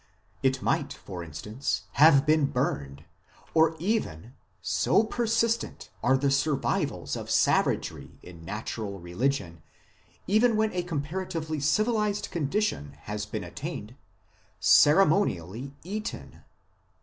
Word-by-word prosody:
It 130 -1 +1
might, 145 -3 0
for 90 -3 -8
instance, 105 - -4
have 145 -2 +6
been 155 -2 +3
burned, 70 - -2 0.5
or 160 0 +4
even 150 - -2 0.3
so 215 - +2
persistent 230 0 -1
are 135 - +3
the 140 +1 +1
survivals 135 0 0
of - - -6
savagery - - +1
in 85 -2 -12
natural 105 +1 -5
religion, 85 - -2 0.6
even 220 +3 +3
when 215 0 +1
a 180 - 0
comparatively 165 0 -3
civilized 210 - +1
con 160 -5 -1
dition 195 - -1
has 105 0 -5
been 105 -1 -4
attained 120 - -7 0.6
ceremonially 140 - +3
eaten." 210 +5 -6
140 Hz, 110 wpm, -27 LUFS, -, 0.6 s, have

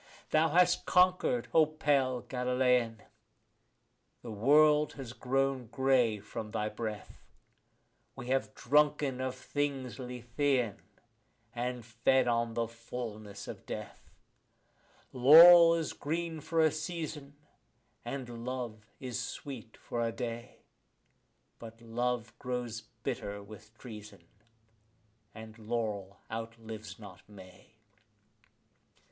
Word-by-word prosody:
Thou 155 +1 +4
hast 180 +2 +3
conquered, 185 +6 +3
O 160 -2 +6
pale 140 -5 +1
Galilean; 125 -3 0 1.2
the 120 - -7
world 150 +7 +4
has 130 -4 -8
grown 135 -1 -1
grey 125 -3 +2
from 105 +1 -7
thy 105 -1 -2
breath; 105 -1 -6 0.9
We 120 - -8
have 120 -5 0
drunken 145 -3 +2
of 130 0 -2
things 135 -2 -3
Lethean, 125 -1 -1 0.7
and 125 -1 -4
fed 125 +3 +2
on 115 -1 0
the 115 -1 0
fullness 115 -3 -8
of - - -9
death. - - -8 1.0
Laurel 165 +6 +9
is 165 -2 -2
green 165 +2 -3
for 165 +2 0
a 155 -1 +4
season, 155 -3 -5 0.7
and 120 -2 -6
love 120 -4 -5
is 125 -5 -4
sweet 125 -5 -8
for 120 - -4
a 115 0 0
day; 115 0 -6 1.0
But 115 -1 -11
love 115 0 -2
grows 125 -3 -4 0.2
bitter 100 0 -4
with 110 +2 -14
treason, 105 -4 -11 1.1
and 110 0 -11
laurel 105 -3 -3
outlives 110 -3 -7
not 95 -4 -12
May. 95 +2 -15
125 Hz, 105 wpm, -31 LUFS, 115-140 Hz, 1.2 s, Laurel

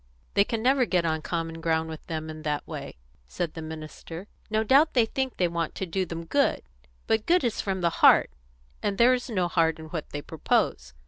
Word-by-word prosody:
"They 200 - +5
can 225 +1 -3
never 260 0 +4
get 180 -6 +1
on 160 -1 0
common 165 0 -3
ground 160 0 +1
with 160 -1 -9
them 160 -1 -4
in 155 0 -9
that 150 -2 -2
way," - - -7 0.3
said 165 - -3
the 160 - -7
minister. 160 +3 -8 0.2
"No 220 0 +1
doubt 280 +7 +4
they 240 -3 +5
think 260 +3 -3
they 180 - +3
want 170 -1 -3
to 190 - -3
do 185 +1 -2
them 165 0 -6
good; 280 +10 +1 0.4
but 220 -1 0
good 350 -2 +4
is 235 -3 0
from 190 -2 -2
the 170 -1 +2
heart, - - +7 0.5
and 200 - -1
there 240 +3 +6
is 250 0 -2
no 185 -6 +1
heart 165 -2 +2
in 160 -1 -10
what 160 -3 -5
they 145 0 -5
propose. 65 - -1
170 Hz, 215 wpm, -27 LUFS, 160-220 Hz, 0.5 s, heart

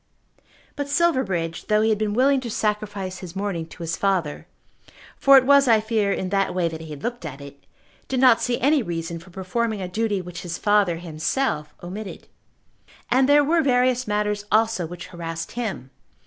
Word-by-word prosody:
But 285 -1 -4
Silverbridge, 235 - 0
though 215 0 +3
he 220 - +3
had 215 -2 +1
been 210 -1 -1
willing 270 +2 +3
to 240 - -5
sacrifice 205 -4 -2
his 180 -2 -9
morning 190 -5 -3
to 170 - -10
his 165 0 -2
father, 185 -7 -1 0.7
for 275 0 +7
it 260 - +4
was, 280 0 +5
I 225 -2 +5
fear, 215 -2 0
in 190 -1 -2
that 195 -1 0
way 180 -2 +1
that 160 -1 -6
he 160 - -9
had 145 -2 -9
looked 240 -3 -4
at 145 -4 -7
it, 140 0 -12 0.4
did 260 - -1
not 250 -3 +6
see 245 -1 0
any 285 +3 +3
reason 170 -4 -4
for 170 - -16
performing 205 +4 -2
a 185 - -4
duty 210 +2 -1
which 180 -1 -7
his 170 -1 -5
father 205 -4 +2
himself 155 - -2
omitted. 190 +3 -7 0.8
And 260 +2 +4
there 290 0 +6
were 325 +3 +3
various 255 -3 +2
matters 210 0 -1
also 220 -4 +2
which 175 +1 -8
harassed 165 -1 -6
him. 200 - -5
205 Hz, 190 wpm, -23 LUFS, 170-240 Hz, 0.8 s, for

